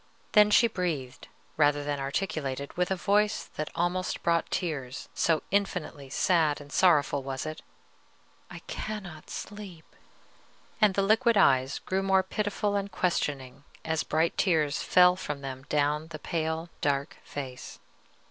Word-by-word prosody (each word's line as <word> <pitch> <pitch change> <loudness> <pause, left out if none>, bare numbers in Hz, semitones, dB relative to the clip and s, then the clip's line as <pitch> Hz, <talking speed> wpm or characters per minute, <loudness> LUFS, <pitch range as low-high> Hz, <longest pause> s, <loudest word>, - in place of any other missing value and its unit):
Then 210 -1 +6
she 210 - +6
breathed, 155 - -4 0.3
rather 145 -1 +3
than 145 -1 -2
articulated, 140 -2 -3
with 180 0 0
a 190 - +1
voice 210 +3 +1
that 155 - -3
almost 180 +2 -1
brought 170 -1 +1
tears, 145 -8 -3
so 165 -2 +1
infinitely 180 -8 -1
sad 155 0 +2
and 145 0 -12
sorrowful 150 -6 +3
was 135 +1 -4
it, 155 0 -6 0.9
"I - - -9
cannot 190 -8 -6
sleep!" 200 -6 -8 1.0
and 205 -3 +5
the 195 - +2
liquid 225 +2 +3
eyes 135 -6 +4
grew 190 +1 -2
more 190 -1 +3
pitiful 205 +1 -1
and 200 0 -2
questioning 140 -7 -2 0.2
as 160 -1 0
bright 160 +2 0
tears 155 -6 +2
fell 180 0 +5
from 150 -6 -5
them 135 -1 -7
down 150 +1 +1
the 160 -1 -7
pale 160 +1 -3
dark 140 -1 -1
face. 130 -3 -7
160 Hz, 140 wpm, -28 LUFS, 145-190 Hz, 1.0 s, Then